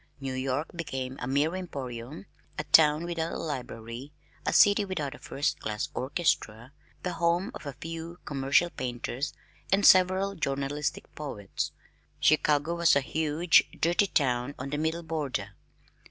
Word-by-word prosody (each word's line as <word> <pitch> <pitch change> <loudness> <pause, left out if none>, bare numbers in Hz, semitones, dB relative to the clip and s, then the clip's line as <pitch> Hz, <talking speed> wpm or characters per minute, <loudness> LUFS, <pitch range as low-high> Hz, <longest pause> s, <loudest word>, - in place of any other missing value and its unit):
New 135 -1 -4
York 130 +4 -1
became 130 -6 -4
a 125 - -4
mere 145 +6 +1
emporium, 140 -4 -6 0.3
a 150 - -1
town 155 0 +5
without 170 -1 -2
a - - -3
library, 125 -3 -6 0.4
a - - +3
city 205 0 +6
without 155 -8 -3
a - - -12
first 145 - -2
class 105 -1 -3
orchestra, 130 -5 -1 0.3
the 180 - -2
home 170 +5 +1
of - - -8
a 140 - -4
few 165 +3 -7
commercial 140 +5 +2
painters 125 +2 -3 0.4
and 195 +1 +4
several 185 +2 +6
journalistic 145 -3 -2
poets! 105 -10 -4 0.5
Chicago 150 +1 +3
was 170 -2 +4
a 140 - +4
huge 160 +4 +3
dirty 175 +5 +3
town 130 -4 0
on 140 - -6
the 145 - -1
middle 160 +2 -1
border. 145 -11 -3
150 Hz, 145 wpm, -28 LUFS, 130-170 Hz, 0.5 s, city